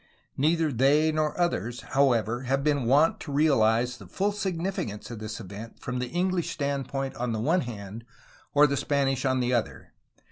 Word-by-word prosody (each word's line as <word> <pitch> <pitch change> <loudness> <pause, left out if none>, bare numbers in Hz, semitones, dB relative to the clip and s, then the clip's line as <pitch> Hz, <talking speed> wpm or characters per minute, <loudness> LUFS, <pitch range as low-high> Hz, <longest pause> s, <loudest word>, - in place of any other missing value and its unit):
Neither 160 +2 +2
they 140 +5 +3
nor 155 +1 -1
others, 120 - -1
however, 120 -4 +1
have 135 +2 0
been 145 -4 +1
wont 145 +7 +4
to 145 - -7
realize 125 -5 +3
the - - -13
full 200 +2 0
signi 190 -4 -3
ficance 105 - -5
of 115 - -6
this 110 0 -6
event 105 +2 -9
from 125 0 -4
the 125 - -2
English 180 0 0
standpoint 135 -1 -2
on 120 0 -2
the 110 - -2
one 165 +10 +2
hand 110 -2 -7 0.5
or 145 +1 +7
the 140 -1 +1
Spanish 135 -2 0
on 130 -1 +2
the 125 0 0
other. 120 -2 -2
135 Hz, 180 wpm, -27 LUFS, 115-150 Hz, 0.5 s, or